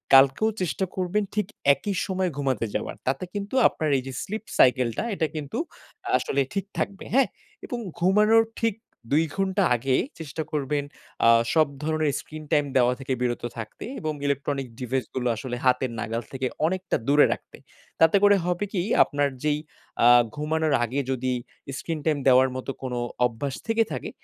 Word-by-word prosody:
কালকেও 135 +11 +6
চেষ্টা 185 +2 0
করবেন 190 +3 0
ঠিক 210 -3 0 0.3
একই 200 +6 -3
সময় 190 -1 -1
ঘুমাতে 135 -4 0
যাওয়ার। - - -3
তাতে 135 +6 0
কিন্তু 205 +4 -4
আপনার 155 - -2
এই 130 - -3
যে 135 - -5
স্লিপ 215 +2 -5
সাইকেলটা 125 -2 +3
এটা 160 -4 0
কিন্তু 145 -2 -4 0.6
আসলে 140 - 0
ঠিক 195 -1 -1
থাকবে 195 -1 -3
হ্যাঁ? 270 0 +5 0.4
এবং 245 - -4 0.2
ঘুমানোর 210 +5 +5 0.2
ঠিক 225 -2 +1 0.4
২ 155 +3 +4
ঘন্টা 195 0 +1
আগে 130 +2 0 0.2
চেষ্টা 160 0 -4
করবেন 145 -1 -1 0.4
আ - - +8 0.2
সব 155 -2 +4 0.2
ধরণের 155 -2 +1
স্ক্রিন 155 0 -9
টাইম 145 -1 +3
দেওয়া 125 0 +4
থেকে 135 0 -2
বিরত 120 -1 -1
থাকতে 110 -1 -7
এবং 155 -1 -2
ইলেকট্রনিক 140 -1 -1
ডিভাইস 130 +1 -1
গুলো 125 -1 0
আসলে 120 +2 -5
হাতের 125 0 +2
নাগাল 115 +1 -2
থেকে 130 -1 -2 0.2
অনেকটা 185 +2 -1
দূরে 145 +1 +6
রাখতে। - - -13 0.4
তাতে 165 +5 +6
করে 205 0 +7
হবে 180 +2 0
কি 180 - +1 0.2
আপনার 145 -1 0
যেই 150 -1 +1 0.5
আ - - +8 0.3
ঘুমানোর 155 0 0
আগে 125 +4 -1
যদি 130 0 -1 0.4
স্ক্রিন 165 -2 -4
টাইম 155 -2 +2
দেওয়ার 130 0 +6
মত 130 - -6
কোন 130 -2 -4 0.3
অভ্যাস 125 +3 -3
থেকে 225 0 +3
থাকে, - - -4
150 Hz, 165 wpm, -25 LUFS, 130-185 Hz, 0.6 s, আ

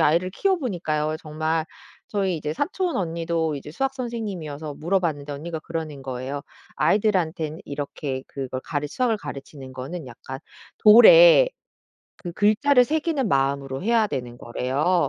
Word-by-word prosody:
아이를 170 +5 +3
키워보니까요. 180 - -1
정말 155 +1 -1 0.4
저희 195 -4 0
이제 150 -1 -3
사촌 355 - -1
언니도 165 -2 -1
이제 145 +1 -7
수학 270 - -2
선생님이어서 185 - -5
물어봤는데 160 -4 -1
언니가 160 +3 -5
그러는 155 -4 -5
거예요. 130 +2 -4 0.3
아이들한테는 175 -6 +1
이렇게 140 -2 -5
그걸 130 -2 -5
가르 150 -1 -3
수학을 240 - 0
가르치는 135 -6 -9
거는 140 +3 -6
약간 130 +3 -9 0.4
돌에 - - +8 0.7
그 175 - -7
글자를 245 +7 +4
새기는 305 -2 0
마음으로 135 -1 0
해야 225 +1 +3
되는 125 -7 -5
거래요. 140 +8 0
160 Hz, 350 characters per minute, -24 LUFS, 140-210 Hz, 0.7 s, 돌에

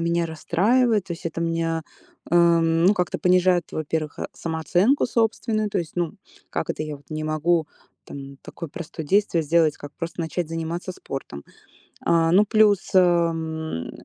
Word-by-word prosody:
меня 170 0 +1
расстраивает. 210 +7 +2
То 170 - -5
есть 165 - -6
это 165 +1 -4
меня, 165 -1 -1 0.5
э, - - +1
м, 170 0 +4
ну 205 - +5
как-то 180 -3 -1
понижает, 180 -1 +3
во-первых, 155 0 -3
э, - - -3
самооценку 175 - +1
собственную, 225 -2 0
то 195 - 0
есть 165 -2 -4
ну: 175 -2 -1 0.4
"Как - - -2
это - - -3
я 150 -1 -5
вот 140 -1 -24
не 155 0 -3
могу 155 +1 +1 0.4
там 140 0 -9
такое 165 - -8
простое 160 0 -7
действие 195 -2 +2
сделать, 160 0 +2
как 145 - -9
просто 170 0 -5
начать 165 0 -3
заниматься 165 +3 -4
спортом." 135 - -7 0.6
А, 165 -1 +3
ну 200 +4 +6
плюс, 210 -2 +3
эм, 165 - +1
170 Hz, 160 wpm, -23 LUFS, 160-180 Hz, 0.6 s, ну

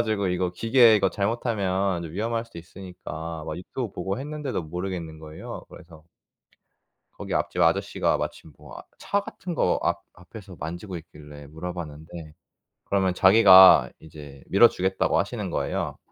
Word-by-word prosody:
그래가지고 100 -2 -1
이거 90 0 -1
기계 115 +3 +5
이거 100 -2 +2
잘못하면 100 -4 -1
위험할 115 +5 -2
수도 115 - -14
있으니까 85 -2 -8
막 75 - -5
유튜브 110 +5 -6
보고 95 +5 -4
했는데도 145 - -4
모르겠는 85 -1 -6
거예요. 80 0 -9
그래서 80 -2 -15 1.1
거기 - - -7
앞집 - - -1
아저씨가 - - +1
마침 80 - -6
뭐 - - -14
아 - - -8 0.2
차 200 - 0
같은 185 -3 -7
거 - - +1
앞 - - -1
앞에서 95 +1 -13
만지고 85 +4 -6
있길래 75 -3 -13
물어봤는데 80 -1 -8 0.5
그러면 95 -2 +1
자기가 95 -1 +8
이제 75 -3 -12
밀어 115 +5 +6
주겠다고 95 +1 0
하시는 - - -3
거예요. - - -3
90 Hz, 355 characters per minute, -25 LUFS, 80-100 Hz, 1.1 s, 자기가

